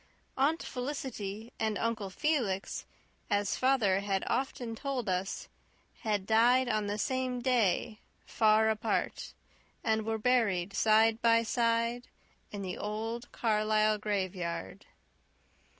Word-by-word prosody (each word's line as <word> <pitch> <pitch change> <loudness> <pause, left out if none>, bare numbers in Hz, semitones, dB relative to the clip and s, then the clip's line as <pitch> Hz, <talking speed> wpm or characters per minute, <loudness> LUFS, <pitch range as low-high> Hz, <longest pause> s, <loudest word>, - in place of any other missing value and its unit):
Aunt 295 +5 +1
Felicity 245 -5 -5
and 220 -2 0
Uncle 225 -3 -2
Felix, 215 -5 -1 0.4
as 205 -1 +1
father 245 -8 +3
had 195 -1 -1
often 250 -3 -2
told 265 -2 -3
us, 185 +1 -2 0.5
had 210 -3 -1
died 240 +4 +4
on 215 -3 0
the 205 +1 -2
same 255 +2 -1
day, 235 -3 +1 0.3
far 220 0 +3
apart, 220 +1 -2 0.5
and 220 -1 +1
were 225 +1 -1
buried 210 -6 +1
side 220 +2 +4
by 230 0 +4
side 230 +1 0 0.4
in 205 -1 -5
the 185 -1 -5
old 225 +3 -4
Carlisle 215 -1 +2
graveyard. 185 -3 -3
220 Hz, 115 wpm, -31 LUFS, 205-240 Hz, 0.5 s, died